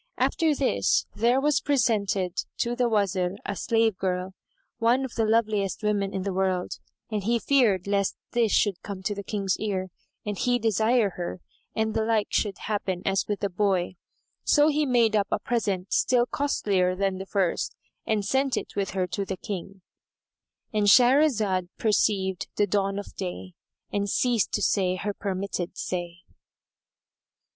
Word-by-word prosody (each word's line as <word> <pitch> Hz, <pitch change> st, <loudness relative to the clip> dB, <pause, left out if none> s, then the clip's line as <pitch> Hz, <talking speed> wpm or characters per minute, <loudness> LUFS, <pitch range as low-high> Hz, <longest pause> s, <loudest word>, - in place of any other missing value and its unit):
After 320 Hz, -3 st, +2 dB
this, 270 Hz, -2 st, +1 dB
there 240 Hz, +4 st, +2 dB
was 295 Hz, +1 st, +2 dB
presented 205 Hz, -9 st, +1 dB, 0.2 s
to 240 Hz, +1 st, -1 dB
the 245 Hz, -1 st, +1 dB
Wazir 195 Hz, -4 st, +1 dB
a 200 Hz, -, -3 dB
slave 225 Hz, +1 st, +1 dB
girl, 185 Hz, 0 st, -2 dB, 0.5 s
one 245 Hz, +3 st, +3 dB
of 255 Hz, -, -8 dB
the 225 Hz, -, +1 dB
loveliest 215 Hz, -2 st, +1 dB
women 205 Hz, -2 st, 0 dB
in 190 Hz, -, -3 dB
the 195 Hz, -1 st, -2 dB
world, 185 Hz, -1 st, -1 dB, 0.3 s
and 210 Hz, -2 st, -2 dB
he 235 Hz, +4 st, +2 dB
feared 230 Hz, -8 st, +2 dB
lest 200 Hz, -1 st, 0 dB
this 235 Hz, -3 st, +2 dB
should 200 Hz, -4 st, +2 dB
come 195 Hz, -2 st, -7 dB
to 205 Hz, -, -1 dB
the 200 Hz, 0 st, -6 dB
King's 195 Hz, -2 st, -1 dB
ears 190 Hz, -3 st, -2 dB, 0.4 s
and 205 Hz, -2 st, -3 dB
he 245 Hz, 0 st, +2 dB
desire 225 Hz, -1 st, +2 dB
her, 175 Hz, 0 st, -4 dB, 0.4 s
and 220 Hz, 0 st, 0 dB
the 220 Hz, -, +1 dB
like 220 Hz, -2 st, +1 dB
should 205 Hz, -4 st, 0 dB
happen 190 Hz, -4 st, -2 dB
as 195 Hz, 0 st, +1 dB
with 205 Hz, -1 st, -2 dB
the 200 Hz, -, 0 dB
boy. 185 Hz, -1 st, 0 dB, 0.5 s
So 295 Hz, +1 st, +4 dB
he 300 Hz, -1 st, +1 dB
made 235 Hz, -4 st, +3 dB
up 200 Hz, -2 st, +2 dB
a -, -, +1 dB
present 200 Hz, -6 st, -2 dB
still 245 Hz, -1 st, +3 dB
costlier 200 Hz, -10 st, 0 dB
than 195 Hz, 0 st, -1 dB
the 190 Hz, -, -6 dB
first 190 Hz, -4 st, 0 dB, 0.3 s
and 210 Hz, -2 st, -1 dB
sent 270 Hz, +4 st, +1 dB
it -, -, -5 dB
with 200 Hz, -1 st, -1 dB
her 185 Hz, -, +2 dB
to 190 Hz, +3 st, -3 dB
the 190 Hz, -1 st, -4 dB
King,——And 200 Hz, +2 st, -7 dB
Shahrazad 225 Hz, -, +4 dB
perceived 195 Hz, -4 st, +1 dB
the 205 Hz, -, +3 dB
dawn 195 Hz, 0 st, 0 dB
of 205 Hz, -, -7 dB
day 185 Hz, -1 st, -6 dB, 0.4 s
and 200 Hz, 0 st, 0 dB
ceased 240 Hz, 0 st, +1 dB
to -, -, 0 dB
say 185 Hz, -2 st, +2 dB
her 205 Hz, +3 st, -3 dB
permitted 190 Hz, -3 st, -4 dB
say. 175 Hz, -1 st, -4 dB
205 Hz, 165 wpm, -26 LUFS, 190-230 Hz, 0.5 s, So